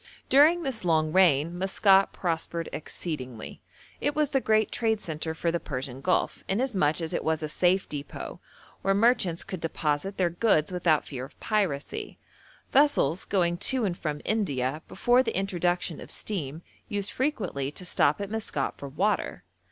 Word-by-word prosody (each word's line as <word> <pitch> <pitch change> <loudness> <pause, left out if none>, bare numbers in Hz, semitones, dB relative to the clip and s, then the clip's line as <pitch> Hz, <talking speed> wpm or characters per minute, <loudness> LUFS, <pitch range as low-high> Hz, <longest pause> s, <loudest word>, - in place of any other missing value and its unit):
During 315 +6 +6
this 260 -8 -3
long 160 -2 +2
reign 170 -3 +4
Maskat 195 +1 +4
prospered 165 -1 -2
exceedingly. 130 -8 -6 0.4
It 290 - -1
was 300 -2 +1
the 270 - +2
great 220 -2 +2
trade 220 -2 +1
centre 160 -3 -4
for 170 +1 0
the 170 - -1
Persian 130 -3 -5
Gulf, 180 +5 0
inasmuch 190 - +1
as 160 - -3
it - - -1
was 160 0 0
a - - -1
safe 180 +5 +2
depôt, 145 -1 -7 0.4
where 195 0 +2
merchants 200 -6 +2
could 185 -3 -7
deposit 160 +3 -1
their 175 -2 +2
goods 175 -4 +2
without 175 -4 +2
fear 130 -3 -6
of 135 - -12
piracy; 190 -10 -2 0.5
vessels 260 - +3
going 175 -3 +1
to 250 +5 +3
and 180 -3 -1
from 150 -3 -4
India 150 - 0
before 245 +6 +3
the 230 -6 -2
introduction 180 -3 -1
of - - -10
steam 160 -6 -4 0.3
used 205 -2 -2
frequently 205 - -2
to 180 - -7
stop 150 -2 +3
at 200 0 -5
Maskat 215 -11 -3
for 140 - -6
water. 185 - -1
175 Hz, 160 wpm, -27 LUFS, 155-210 Hz, 0.5 s, During